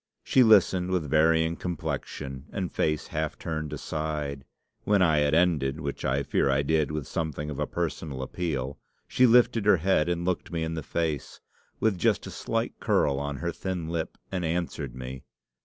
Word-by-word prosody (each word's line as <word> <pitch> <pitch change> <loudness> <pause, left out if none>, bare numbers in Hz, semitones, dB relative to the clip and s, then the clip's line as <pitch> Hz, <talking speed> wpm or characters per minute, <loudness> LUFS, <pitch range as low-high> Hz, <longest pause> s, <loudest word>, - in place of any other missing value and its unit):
She 130 - +4
listened 95 -5 +5
with 90 -5 0
varying 80 +1 +3
complexion 75 -5 -5
and 95 -3 -3
face 75 -1 0
half 80 +1 -2
turned 80 -2 -4
aside. 75 -2 -3 0.4
When 105 -1 +3
I 80 -4 +4
had 75 +1 +2
ended, 80 -5 +2
which 70 -3 -4
I 70 +2 +1
fear 70 - +1
I 70 +1 +2
did 75 0 +2
with 75 -2 -3
something 75 -2 -3
of 70 - -6
a - - 0
personal 75 -5 -3
appeal, 70 -3 -3 0.3
she 125 - +4
lifted 115 -2 +4
her 100 - +7
head 85 -1 +2
and 85 0 -1
looked 90 0 -2
me 85 -1 -1
in 80 0 -2
the 80 - -3
face, 80 -1 -3 0.4
with 105 -5 +1
just - - +2
a - - -7
slight - - -2
curl 70 -1 +2
on 70 0 -3
her 85 +5 -2
thin 90 -3 -4
lip, 85 -1 -3
and 90 -2 -2
answered 80 -6 -2
me. 65 0 -7
80 Hz, 180 wpm, -27 LUFS, 70-85 Hz, 0.4 s, her